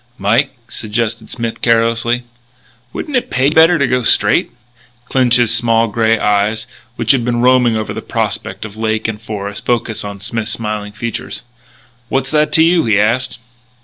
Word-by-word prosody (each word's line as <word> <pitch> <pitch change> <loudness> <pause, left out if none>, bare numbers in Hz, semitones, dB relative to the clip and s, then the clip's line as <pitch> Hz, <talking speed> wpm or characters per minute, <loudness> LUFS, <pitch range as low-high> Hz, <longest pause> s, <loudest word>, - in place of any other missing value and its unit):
"Mike," 115 +8 +1
suggested 115 +1 -3
Smith 115 -2 -4
carelessly, 115 +1 +2 0.7
"wouldn't 295 - -5
it 250 - 0
pay 130 +1 0
you - - -5
better 165 +2 +5
to 140 - +2
go 125 0 +1
straight?" 115 - +2 0.6
Clinch's 120 -3 +2
small 115 -1 +2
grey 115 +1 +2
eyes, 105 +2 +1 0.3
which 115 - +2
had 130 -4 +2
been 120 0 0
roaming 125 -2 +4
over 110 - -3
the - - -5
prospect - - -3
of 105 -1 -9
lake 110 0 -1
and 110 -1 -5
forest, 105 -2 -5
focussed 120 -2 -1
on 100 -1 -7
Smith's 110 +3 -3
smiling 105 -2 -3
features. 115 +2 -5 0.7
"What's 135 0 -1
that 150 0 +2
to 160 - +5
you?" 170 0 +3
he 105 -3 +3
asked. 120 +4 +1
115 Hz, 165 wpm, -16 LUFS, 110-125 Hz, 0.7 s, better